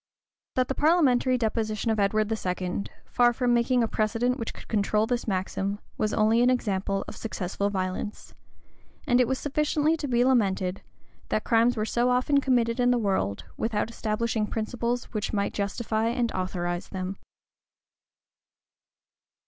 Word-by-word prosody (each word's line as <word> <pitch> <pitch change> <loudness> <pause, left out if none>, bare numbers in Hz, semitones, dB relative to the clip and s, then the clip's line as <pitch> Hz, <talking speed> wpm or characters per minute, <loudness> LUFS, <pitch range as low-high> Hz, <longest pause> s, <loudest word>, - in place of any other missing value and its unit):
That 255 -1 +2
the - - -1
parliamentary 270 -5 +3
deposition 220 -1 -1
of 220 - 0
Edward 215 +2 +1
II., 185 -1 -2 0.2
far 240 0 +3
from 245 0 +1
making 240 +1 +3
a - - +1
precedent 230 +4 0
which 230 - -3
could - - -13
control 210 0 +1
this 240 0 -2
maxim, 195 0 -1 0.2
was 215 - 0
only 220 +2 +3
an 245 - +5
example 195 -5 0
of - - -7
successful 200 -2 -3
violence; 190 +1 -4 0.7
and 245 0 +3
it 245 - +2
was 265 +1 0
sufficiently 300 +2 +1
to 295 - -4
be 245 -1 +2
lamented, 195 -7 +1 0.5
that - - 0
crimes 235 0 +3
were 215 - 0
so 240 +2 +1
often 255 +3 +3
committed 240 -3 +1
in 245 0 +4
the 245 - +3
world, 190 - -1
without 225 0 -1
establishing 220 -1 -1
principles 235 +2 -2
which 215 0 -2
might 200 -1 0
justify 220 +2 -1
and 235 0 0
authorize 175 -1 -3
them. 190 0 -4
225 Hz, 150 wpm, -27 LUFS, 200-245 Hz, 0.7 s, an